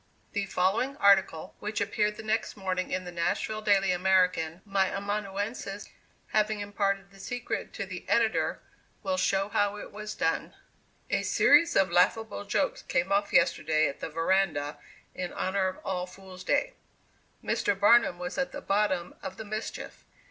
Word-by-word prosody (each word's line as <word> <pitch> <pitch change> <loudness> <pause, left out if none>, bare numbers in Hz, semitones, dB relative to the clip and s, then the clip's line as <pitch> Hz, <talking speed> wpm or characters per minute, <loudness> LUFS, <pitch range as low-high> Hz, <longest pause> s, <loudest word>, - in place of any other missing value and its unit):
The 205 -1 -2
following 200 +10 +1
article, 195 - +3
which 210 +1 -3
appeared 210 +1 0
the - - -7
next 220 0 -1
morning 185 -2 -2
in 185 0 -2
the 180 - -6
Nashville 175 +5 -1
Daily 195 -3 +3
American, 180 -2 +2
my 195 -1 +2
amanuensis 200 +1 -4 0.4
having 215 0 +1
imparted 200 -1 -1
the 195 - -17
secret 245 +4 -4
to 200 - -4
the 185 -2 -8
editor, 225 -2 +2 0.4
will 285 - 0
show 195 -5 +1
how 205 0 +1
it - - -8
was 210 +1 -6
done: 165 - -1 0.6
"A - - +2
series 335 - +4
of 190 -2 +3
laughable 205 +4 +2
jokes 275 +7 0
came 175 +3 -1
off 200 +1 +2
yesterday 160 -2 +3
at 140 - -6
the - - -4
Veranda 165 -3 0 0.3
in 180 -1 -4
honor 190 0 0
of 185 - -4
All 180 -1 -2
Fools' 185 0 -12
Day. - - +1 0.7
Mr. 200 -1 0
Barnum 210 -3 +5
was 180 +7 -4
at 270 - -1
the 285 - -6
bottom 195 -5 0
of 190 - -6
the 220 - -7
mischief. 215 +1 -6
195 Hz, 160 wpm, -29 LUFS, 185-210 Hz, 0.7 s, Barnum